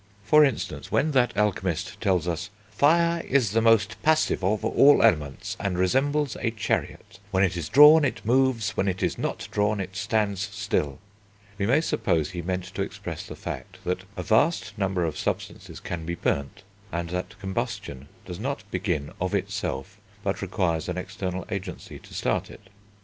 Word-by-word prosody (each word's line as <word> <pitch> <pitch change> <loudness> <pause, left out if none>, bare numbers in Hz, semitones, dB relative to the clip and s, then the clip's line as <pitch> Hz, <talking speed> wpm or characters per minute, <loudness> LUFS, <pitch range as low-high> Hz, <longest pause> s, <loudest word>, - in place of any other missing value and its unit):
For 150 +8 +6
instance, 135 -5 -2
when 155 +3 +2
that 125 -4 +2
alchemist 95 -2 -1
tells 90 -5 +1
us, 85 +3 -2 0.2
"Fire 170 +7 +3
is 125 -7 +2
the 115 +1 +2
most 115 -1 +3
passive 155 -9 +2
of 105 +3 +1
all 140 +5 +6
elements, 75 -4 +1
and 100 -3 -1
resembles 135 +8 +1
a 115 - +1
chariot; 105 -3 -3
when 95 -1 +2
it 95 -1 +1
is 85 -3 -4
drawn, 150 +2 +8
it 115 -6 -2
moves; 120 -3 +2
when 100 - -1
it 95 -1 -1
is - - -1
not - - -3
drawn, 105 0 +1
it 95 0 -5
stands 105 -1 0
still" 100 -9 -2 0.6
we 100 - +1
may 135 +7 +4
suppose 80 - 0
he 85 - -4
meant 90 +1 -2
to - - -3
express - - -5
the - - -8
fact - - -7
that 90 +1 -2
a 90 - -3
vast 145 - +2
number 95 -4 0
of 80 -2 -3
substances - - -4
can 85 -2 -5
be 85 +1 -3
burnt, 70 +3 -2 0.3
and 85 0 -3
that 90 0 -4
combustion 80 -7 -4 0.2
does 90 - -7
not 140 +5 -3
begin 90 -6 -2
of 95 +2 0
itself, 100 -8 -3 0.2
but - - -2
requires 85 -2 -1
an 90 - -3
external 95 -1 -4
agency 95 -3 -6
to - - -14
start - - -1
it. 95 -2 -15
100 Hz, 175 wpm, -26 LUFS, 90-115 Hz, 0.6 s, drawn